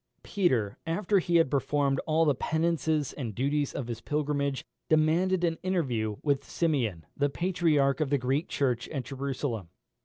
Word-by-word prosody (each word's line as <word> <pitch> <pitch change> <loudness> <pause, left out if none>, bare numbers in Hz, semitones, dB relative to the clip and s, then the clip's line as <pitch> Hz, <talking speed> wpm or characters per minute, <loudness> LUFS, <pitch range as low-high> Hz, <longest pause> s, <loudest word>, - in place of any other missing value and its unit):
Peter, 125 - 0
after 195 +4 +2
he 175 -1 -1
had 165 -5 +4
performed 140 -1 +1
all 160 +1 +3
the 145 - +4
penances 160 0 0
and 115 -8 -5
duties 140 +3 0
of 135 - -3
his 115 -1 -5
pilgrimage, 145 -1 -1 0.2
demanded 170 +4 +3
an 165 -2 0
interview 130 - -1
with 140 -2 +1
Simeon, 120 - -1
the 145 0 +1
Patriarch 160 -5 +1
of 150 - +1
the 140 - +3
Greek 135 +6 0
Church 125 -4 -1
at 135 -4 -3
Jerusalem. 135 - -3
145 Hz, 155 wpm, -29 LUFS, 130-165 Hz, 0.2 s, had